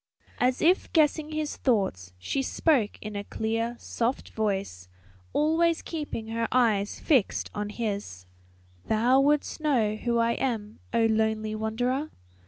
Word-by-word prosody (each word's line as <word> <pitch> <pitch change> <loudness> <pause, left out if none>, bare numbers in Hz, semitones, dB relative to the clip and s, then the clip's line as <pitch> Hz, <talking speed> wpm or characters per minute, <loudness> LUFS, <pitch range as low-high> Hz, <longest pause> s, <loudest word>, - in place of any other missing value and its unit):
As 250 +1 +1
if 355 +4 +3
guessing 310 -1 +2
his 310 -1 -3
thoughts 190 - 0
she 90 - -2
spoke 265 -5 +1
in 210 -1 -6
a 200 - -3
clear, 225 +3 -2
soft 235 +2 -2
voice, 195 - -2 0.4
always 325 +2 +2
keeping 295 -9 -5
her 230 0 -1
eyes 215 -5 +2
fixed 260 -10 +1
on 210 0 -3
his, 200 - -4 0.6
"Thou 240 +5 +4
wouldst 295 +3 +1
know 235 -9 +2
who 235 +1 0
I 230 0 +3
am, 225 -4 -2
O 230 0 +3
lonely 220 -1 +1
wanderer? 245 +7 -1
230 Hz, 135 wpm, -27 LUFS, 215-275 Hz, 0.6 s, Thou